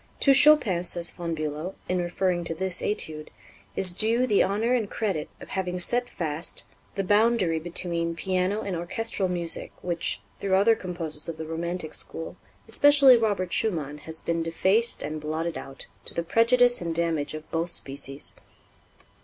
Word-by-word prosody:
"To 275 - +7
Chopin," 270 - +6
says 175 -1 +2
Von 170 -2 -4
Bülow, 155 +4 -4
in 180 0 0
referring 175 0 -1
to 165 - -3
this 185 +1 -2
Étude, 155 -7 -2 0.5
"is 185 -2 +5
due 225 +6 +2
the 210 -5 +3
honor 220 +5 +1
and 225 -5 0
credit 195 -9 -3
of - - -12
having 180 -1 -3
set 245 +7 +1
fast 160 -1 -3 0.3
the 195 - -1
boundary 205 -4 +2
between 170 0 -1
piano 185 +4 -1
and 195 -4 -4
orchestral 190 +3 -1
music 170 -2 -2
which, 175 -1 0 0.2
through 195 -1 +1
other 205 +4 +5
composers 165 -6 -4
of 165 - -6
the 160 - -6
romantic 165 0 -4
school, 165 +2 -2 0.3
especially 275 +2 +6
Robert 205 -6 0
Schumann, 155 -9 0
has 160 +2 -5
been 170 0 -1
defaced 190 +8 +1
and 155 0 -5
blotted 160 +2 -3
out, 135 -1 -8 0.2
to - - -10
the 170 - -1
prejudice 245 +5 +3
and 170 -1 -3
damage 160 -3 0
of 155 0 -9
both 165 +2 -1
species." 140 -3 -6
175 Hz, 160 wpm, -26 LUFS, 165-210 Hz, 0.5 s, To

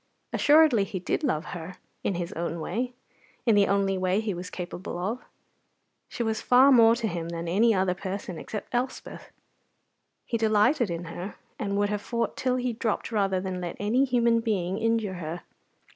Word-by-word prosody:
Assuredly 295 -7 +5
he 195 - -5
did 180 - -2
love 160 - 0
her 175 +1 -7 0.3
in 195 - 0
his 175 +2 -4
own 170 -1 -3
way, 245 +10 -3 0.5
in 230 - +5
the 205 -1 +5
only 195 -1 +1
way 185 +2 +1
he 215 -2 -2
was 180 +1 -6
capable 180 0 -6
of. 210 +8 -3 0.9
She 235 - -3
was 220 -1 -1
far 260 +3 +6
more 230 -3 +7
to 230 -1 -2
him 170 -4 -4
than 170 0 -4
any 215 +7 +4
other 185 -1 +2
person 190 -2 -5
except 215 - -7
Elspeth. 250 +2 -3 1.0
He 230 - -2
delighted 220 +3 +3
in 170 0 -3
her, 175 +4 -7 0.2
and 200 -1 -1
would 205 0 +2
have 210 -1 -2
fought 235 +1 -2
till 255 -1 0
he 250 -1 -1
dropped 220 0 -2
rather 195 -4 +1
than 185 -1 -4
let 175 -1 -5
any 225 +6 +2
human 235 -3 +3
being 195 -4 -1
injure 225 -3 0
her. 165 +2 -5
205 Hz, 180 wpm, -27 LUFS, 180-235 Hz, 1.0 s, more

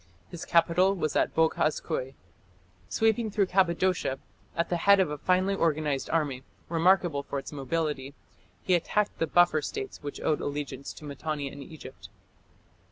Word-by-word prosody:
His 175 -2 -7
capital 170 +3 +3
was 155 -5 -2
at - - +1
Boghaz 160 -1 +2
Köi. 130 +1 -4 0.7
Sweeping 225 0 +1
through 205 -1 +2
Cappadocia, 185 -5 +1 0.4
at 170 - 0
the 175 - +1
head 200 +3 +5
of 185 -6 +2
a 150 - -3
finely 185 +4 +2
organized 155 -6 0
army, 145 -5 0 0.3
remarkable 170 -2 +3
for 140 - -5
its 135 - -6
mobility, 145 -1 -3 0.5
he 185 - +1
attacked 205 +4 0
the 165 - +1
buffer 175 -1 +4
states 410 - -5
which 145 -1 -6
owed 155 - 0
allegiance 140 -2 -4
to 150 - -12
Mitanni 145 0 -4
and 140 - -10
Egypt. 140 -2 -11
160 Hz, 155 wpm, -28 LUFS, 145-185 Hz, 0.7 s, head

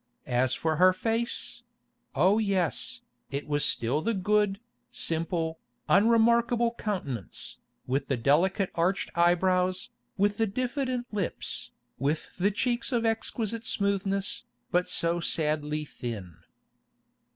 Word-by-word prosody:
As 125 +1 +1
for 160 -1 0
her 185 +2 +6
face—oh 225 - -1
yes, 200 +5 0 0.3
it 140 +1 -4
was 145 0 +1
still 125 +5 +2
the 230 +6 0
good, 205 +1 +2 0.3
simple, 165 0 -1 0.3
unremarkable 235 +3 +4
countenance, 145 - -4 0.3
with 135 +2 -1
the 135 - 0
delicate 180 - +2
arched 180 +4 0
eyebrows, 185 +4 +2 0.3
with 205 +1 +2
the 225 - +2
diffident 255 +3 -2
lips, 200 -4 -2 0.3
with 145 +4 -1
the 190 +3 +3
cheeks 235 +4 -1
of 235 -2 +1
exquisite 225 0 -1
smoothness, 200 -2 0 0.3
but 180 +1 +2
so 170 +1 +2
sadly 150 -2 0
thin. 105 - -7
190 Hz, 110 wpm, -28 LUFS, 155-225 Hz, 0.3 s, her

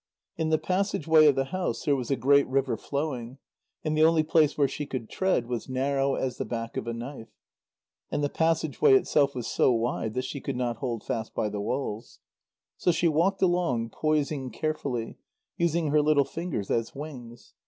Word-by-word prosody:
In 160 -1 -1
the 160 - +3
passage 185 0 -1
way 155 -1 +7
of 145 - +5
the 135 0 -1
house 185 -1 -2
there 145 - +3
was 125 -3 -4
a 135 - +2
great 140 +3 +4
river 130 -2 0
flowing, 135 -3 -4 0.5
and 155 -1 -1
the 155 - +2
only 160 0 +5
place 155 -1 +3
where 145 -2 +4
she 145 +2 -5
could 120 -4 -5
tread 190 -10 +1
was 120 +1 -4
narrow 135 +1 0
as 130 -1 -2
the - - 0
back 115 -1 -5
of - - -4
a 115 - -2
knife. 120 -1 -8 0.8
And 145 - -1
the - - +3
passage 160 0 0
way 425 -3 +7
itself 145 - +2
was 125 -3 -4
so - - +2
wide 115 -2 -1
that 130 0 -1
she 135 +1 -5
could 140 - -3
not 120 -2 -1
hold 120 -3 -3
fast 115 -4 -4
by 105 - 0
the 105 0 -4
walls. 115 -1 -4 0.6
So 175 - +2
she 170 +1 +1
walked 170 +5 +2
along, 170 -11 +1
poising 150 -3 -1
carefully, 135 -2 -3 0.4
using 170 -2 +1
her 150 0 +4
little 145 -2 +3
fingers 160 - -4
as 115 +3 -1
wings. 130 -5 -9
140 Hz, 195 wpm, -27 LUFS, 120-155 Hz, 0.8 s, way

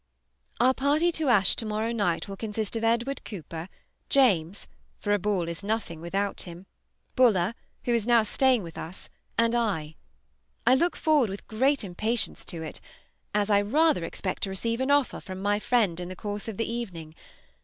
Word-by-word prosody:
Our 255 +2 +5
party 295 +6 +2
to 315 -4 0
Ashe 200 -6 +5
to - - 0
morrow 215 +2 -1
night 200 -7 0
will 195 - -6
consist 215 +1 -3
of 225 - -2
Edward 235 +4 +1
Cooper, 170 -3 -7 0.4
James 200 -9 +3 0.3
(for 205 - 0
a 205 - +2
ball 190 -3 0
is 170 +3 -5
nothing 200 -6 -2
without 195 +4 -1
him), 175 +1 -9 0.5
Buller, 215 -6 +4 0.3
who 240 - +1
is 230 -1 +1
now 235 -2 +5
staying 250 +1 +2
with 165 -1 -8
us, 170 +4 -8 0.3
and 230 0 +3
I. 195 -10 0 0.7
I 250 - +6
look 340 +7 +2
forward 300 -8 +3
with 195 +1 -7
great 265 +5 +2
impatience 215 +5 -1
to 165 -3 -4
it, 155 - -7 0.5
as 210 0 +2
I 200 0 +5
rather 290 - +3
expect 185 +3 -4
to 195 - -1
receive 230 +5 -1
an 260 - 0
offer 285 -2 +2
from 185 0 -7
my 205 +1 +1
friend 210 -7 +1
in 175 0 -5
the 185 - -6
course 205 +2 -5
of 220 -4 -5
the 225 - 0
evening. 185 -10 -5
210 Hz, 185 wpm, -27 LUFS, 185-240 Hz, 0.7 s, I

